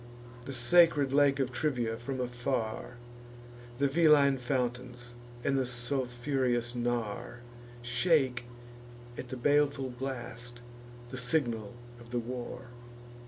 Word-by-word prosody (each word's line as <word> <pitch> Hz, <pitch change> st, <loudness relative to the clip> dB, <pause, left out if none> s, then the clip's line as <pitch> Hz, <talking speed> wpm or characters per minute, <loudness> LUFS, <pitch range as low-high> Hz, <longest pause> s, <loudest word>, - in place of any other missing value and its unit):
The 135 Hz, -, -5 dB
sacred 140 Hz, +2 st, +5 dB
lake 140 Hz, -1 st, +4 dB
of 130 Hz, -2 st, 0 dB
Trivia 120 Hz, -4 st, -1 dB
from 130 Hz, +3 st, -5 dB
afar, 120 Hz, -1 st, -3 dB, 0.8 s
The 140 Hz, +1 st, +3 dB
Veline 140 Hz, -3 st, +5 dB
fountains, 125 Hz, -1 st, -3 dB, 0.3 s
and 135 Hz, -1 st, +2 dB
sulphureous 125 Hz, 0 st, -1 dB
Nar, 120 Hz, 0 st, -3 dB, 0.4 s
Shake 125 Hz, -1 st, +2 dB, 0.7 s
at 125 Hz, -, -7 dB
the 130 Hz, -, -5 dB
baleful 140 Hz, 0 st, +2 dB
blast, 120 Hz, -1 st, -6 dB, 0.5 s
the 130 Hz, -, -6 dB
signal 120 Hz, -4 st, 0 dB, 0.2 s
of 120 Hz, 0 st, -14 dB
the 120 Hz, -, -2 dB
war. 120 Hz, 0 st, -5 dB
125 Hz, 105 wpm, -31 LUFS, 120-135 Hz, 0.8 s, sacred